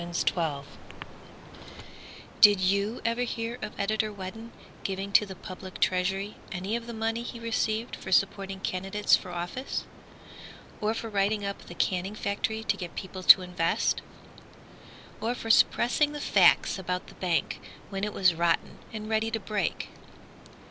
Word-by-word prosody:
Daisy 170 0 0
Fraser 155 -5 -2 1.8
Did 205 -3 +9
you 200 +4 +1
ever 230 +1 +1
hear 235 0 -3
of 215 - -7
Editor 215 +1 0
Whedon 210 +4 -8 0.3
Giving 195 +1 -3
to 210 +1 +5
the 190 - -8
public 185 +1 -9
treasury 195 +2 0
any 190 +3 -2
of 235 0 -4
the 235 - -6
money 225 +1 -1
he 240 0 -7
received 225 0 -1
For 190 - -8
supporting 195 0 +1
candidates 195 +3 +2
for 185 - -6
office? 175 +10 -4 1.0
Or 215 +1 +1
for 225 - -4
writing 205 0 0
up 200 0 -5
the 175 - -9
canning 185 +3 -1
factory 215 +2 -2
To - - 0
get 175 -3 -7
people 190 -1 -6
to 185 +1 +9
invest? 175 -2 0 1.2
Or 235 +2 0
for 225 -2 -1
suppressing 290 +6 +4
the 295 - -5
facts 245 - +4
about 180 0 -3
the - - -14
bank, 175 -3 -1 0.3
When 195 0 -4
it 210 - 0
was 185 -3 +3
rotten 170 0 0
and 215 -1 -6
ready 220 0 +1
to 225 0 -2
break? 205 -4 -2
200 Hz, 155 wpm, -28 LUFS, 185-225 Hz, 1.8 s, Did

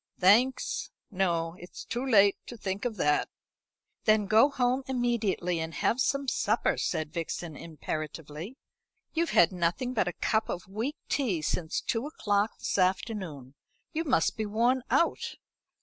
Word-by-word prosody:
"Thanks, 230 +8 +3 0.2
no; 170 -4 0
it's 175 - -10
too 240 +2 -3
late 205 -6 +5
to 240 - -8
think 195 +1 -3
of 235 -3 -1
that." 150 -3 +2 0.8
"Then 215 -1 +4
go 220 +7 +5
home 255 -1 +1
immediately, 235 -9 0
and 160 0 -4
have 240 - +1
some 275 +1 0
supper," 220 -2 +1
said 155 0 -2
Vixen 165 -1 -4
imperatively. 155 - -6 0.6
"You've 335 +1 +1
had 170 - +5
nothing 180 +8 -1
but 215 -7 +1
a 175 - -1
cup 220 -1 0
of 180 +1 -4
weak 225 +10 -3
tea 205 - 0
since 160 +1 -1
two 230 +4 -1
o'clock 205 -7 0
this - - -2
afternoon. 185 - -1 0.4
You 325 - 0
must 270 -5 +2
be 215 -1 -1
worn 240 +5 +2
out." 335 - +1
205 Hz, 150 wpm, -29 LUFS, 170-245 Hz, 0.8 s, late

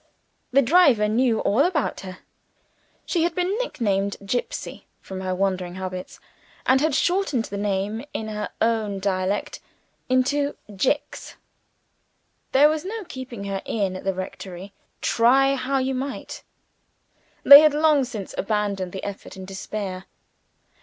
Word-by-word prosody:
The 275 +2 +4
driver 260 -7 +5
knew 225 +1 +2
all 210 - +1
about 330 -4 0
her. 185 -1 -8 0.9
She 345 - 0
had 335 0 0
been 365 +2 0
nicknamed 200 - -1
"Gipsy" 250 - -4
from 190 -1 -8
her 185 -1 -2
wandering 185 -2 -1
habits, 185 -1 -6 0.5
and 265 +1 +4
had 310 -2 +1
shortened 350 - +1
the 200 - -6
name 205 +3 -2
in 220 - -4
her 210 -1 -4
own 220 -3 0
dialect, 190 +1 -1 0.5
into 280 +3 +1 0.2
"Jicks." 270 +8 -2 1.2
There 280 +3 +6
was 310 0 -1
no 430 +3 -5
keeping 260 - -8
her 195 -1 -3
in 195 -4 -2
at 185 - -7
the 195 -1 -1
rectory, 185 +1 -7 0.3
try 270 +4 +4
how 270 0 -1
you 265 0 0
might: 265 +1 -5 1.0
they 280 0 +12
had 305 -1 +4
long 305 -2 +4
since 225 -6 -6
abandoned 200 -3 -1
the 190 - -6
effort 200 0 -7
in 190 - -8
despair. 190 0 -5
220 Hz, 140 wpm, -23 LUFS, 195-275 Hz, 1.2 s, they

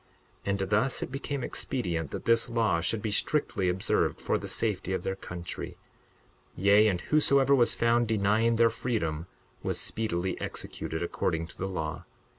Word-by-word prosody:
62:10 - - -2
And 95 - -2
thus 110 +5 +2
it - - -6
became 135 0 -3
expedient 85 - -2
that - - -6
this 115 0 +3
law 110 -8 +2
should 105 +5 -1
be 110 - -1
strictly 105 -5 +1
observed 90 +1 +1
for - - 0
the - - -6
safety 100 -4 -1
of - - -2
their 95 - -2
country; 90 -2 -7 0.8
yea, 100 +3 +5
and 95 -4 +1
whosoever 140 -1 +4
was 120 -4 +4
found 115 0 +3
denying 110 +2 +2
their 115 0 +4
freedom 90 -10 -2 0.3
was - - -1
speedily 95 -5 -2
executed 80 +1 -4
according 80 -1 -1
to 85 - -12
the 95 - -1
law. 80 -4 -4
105 Hz, 165 wpm, -29 LUFS, 90-115 Hz, 0.8 s, yea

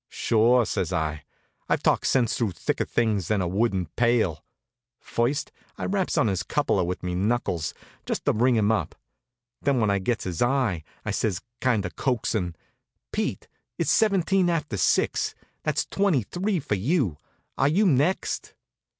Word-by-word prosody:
"Sure," 120 +2 +3
says - - -2
I. 75 -1 -2 0.4
"I've - - +1
talked - - +2
sense 125 -4 +2
through 110 -6 -1
thicker - - -1
things 105 -7 0
than 105 - +1
a 90 - 0
wooden 95 0 +1
pail." 110 -2 +1 0.6
First 130 +5 -1 0.3
I - - -3
raps 190 -2 0
on - - +4
his 95 -4 0
cupola 140 -10 +1
with 90 +1 -3
me 90 0 -2
knuckles, 95 -5 -1 0.3
just - - -2
to - - +4
ring 125 +3 +3
him 110 -1 +3
up. 110 - -1 0.7
Then, 140 -2 +2
when 105 -3 +2
I 100 - +1
gets 110 +4 -1
his 90 -3 -4
eye, 120 - +1 0.2
I - - -1
says, 100 -4 -1 0.2
kind 115 -6 +1
of 85 -3 -6
coaxin': 110 -8 -1 0.6
"Pete, - - -2 0.3
it's - - +1
seventeen 195 -3 +3
after 155 -9 -1
six. 95 - +1 0.3
That's - - 0
twenty 195 - +1
three 185 - -1
for 135 -6 -3
you. 105 - +1 0.4
Are 135 - +2
you 185 +9 +3
next?" 160 +2 +1
115 Hz, 160 wpm, -25 LUFS, 95-140 Hz, 0.7 s, on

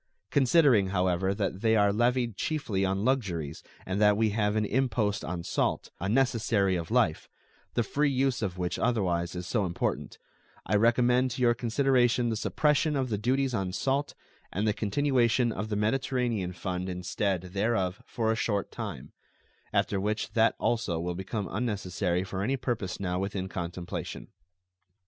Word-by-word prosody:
Considering, 135 - +4
however, 95 0 +1
that 100 -1 -2
they 110 -1 +3
are 100 -1 +4
levied 120 0 +1
chiefly 110 -9 -1
on 95 +2 0
luxuries 90 - -1 0.2
and 95 +2 -2
that 105 -1 +5
we 110 -1 +2
have 105 0 0
an 110 -1 +1
impost 115 -3 0
on 90 -2 -4
salt, - - -1
a 95 - -2
necessary 110 -5 +2
of 85 -2 -4
life, - - +1 0.5
the 120 - +2
free 145 +7 +1
use 135 -2 +1
of 95 -4 -2
which 90 -1 -2
otherwise 90 -7 0
is 90 0 -4
so 105 +3 0
important, 85 -2 -2 0.5
I 105 - +1
recommend 125 +3 +3
to 125 - -2
your 120 -1 +5
consideration 120 0 +2
the 110 - -1
suppression 150 +7 +1
of 130 -2 0
the 105 - 0
duties 130 +3 +1
on 95 -4 -2
salt 140 +6 -1 0.4
and 100 +5 -1
the 105 - +3
continuation 120 +1 +2
of 105 +1 -4
the 105 - -1
Mediterranean 115 -3 0
fund 90 0 -4
instead 90 +1 -1
thereof 100 -2 0
for 110 -2 0
a - - +1
short 105 -3 -1
time, 100 - -6 0.6
after 100 - +1
which 105 +2 -2
that 115 0 +3
also 100 -8 0
will 90 +1 -2
become 95 +3 -4
unnecessary 95 -5 -1
for 95 0 -4
any 130 +7 0
purpose 115 -7 -3
now 90 -2 -1
within 95 -1 -3
contemplation. 90 -1 -5
105 Hz, 165 wpm, -28 LUFS, 95-120 Hz, 0.6 s, that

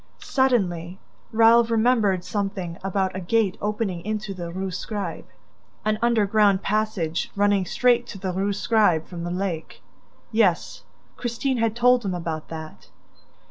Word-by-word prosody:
Suddenly, 190 - 0 0.3
Raoul 230 +1 +6
remembered 225 -5 +2
something 195 -4 -3
about 190 -1 -1
a - - -2
gate 195 +1 +1
opening 205 -4 -2
into 215 0 -3
the 175 -2 -6
Rue 190 +1 -4
Scribe, 190 -1 -5 0.6
an 215 0 +1
underground 210 -4 +3
passage 200 -6 -1
running 205 -2 +2
straight 245 +2 +2
to 205 - -8
the 185 -1 -3
Rue 195 +2 0
Scribe 200 -6 +2
from 170 -2 -7
the 175 - -3
lake... 180 -3 -4 0.5
Yes, 215 -6 +1 0.4
Christine 245 +2 -1
had 225 -1 0
told 245 0 +4
him 190 -3 -2
about 165 -3 -4
that... 160 -1 -9
200 Hz, 140 wpm, -24 LUFS, 180-225 Hz, 0.6 s, Raoul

